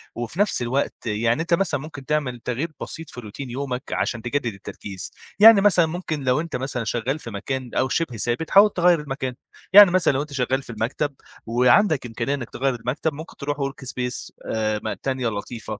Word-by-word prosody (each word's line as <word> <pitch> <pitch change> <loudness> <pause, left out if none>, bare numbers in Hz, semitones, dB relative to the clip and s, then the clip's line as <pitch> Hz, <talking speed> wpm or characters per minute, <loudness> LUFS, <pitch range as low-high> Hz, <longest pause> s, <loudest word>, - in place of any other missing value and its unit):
وفي 120 +8 -5
نفس 205 -10 +2
الوقت 130 +4 0
يعني 115 +5 +1
أنت 170 +1 -1
مثلًا 170 -5 +1
ممكن 145 -2 -9
تعمل 140 -4 -1
تغيير 130 +8 -3
بسيط 165 0 -7
في 125 - -9
Routine 120 +5 -8
يومِك 130 0 -3
علشان 120 -2 -1
تجدد 120 -1 -2
التركيز، 100 -1 -8 0.3
يعني 215 -1 +9
مثلًا 185 -5 +5
ممكن 160 -3 -4
لو 130 +3 +2
أنت 165 0 -5
مثلًا 125 -2 -2
شغال 120 +7 -2
في 115 - -8
مكان 130 +5 -4
أو 130 - +1
شبه 130 -3 -1
ثابت، 120 +8 -2
حاول 205 +2 +8
تغيّر 175 -3 +3
المكان، 135 -3 -4 0.4
يعني 205 -2 +10
مثلًا 185 -5 +3
لو 135 - 0
أنت 145 -1 -7
شغال 130 0 0
في - - -14
المكتب 130 +6 -2 0.3
وعندَك 125 - +3
إمكانية 120 +3 -2
إنَّك 120 -4 -7
تغيّر 135 0 -1
المكتب، 125 +6 -2
مُمكن 155 +3 -10
تروح 145 0 -3
Work 135 -1 -4
space 125 0 -4 0.2
آآ 110 -1 -1
ما 110 - -2
تانية 130 -2 -1
لطيفة، 110 0 -5
135 Hz, 195 wpm, -23 LUFS, 120-155 Hz, 0.4 s, يعني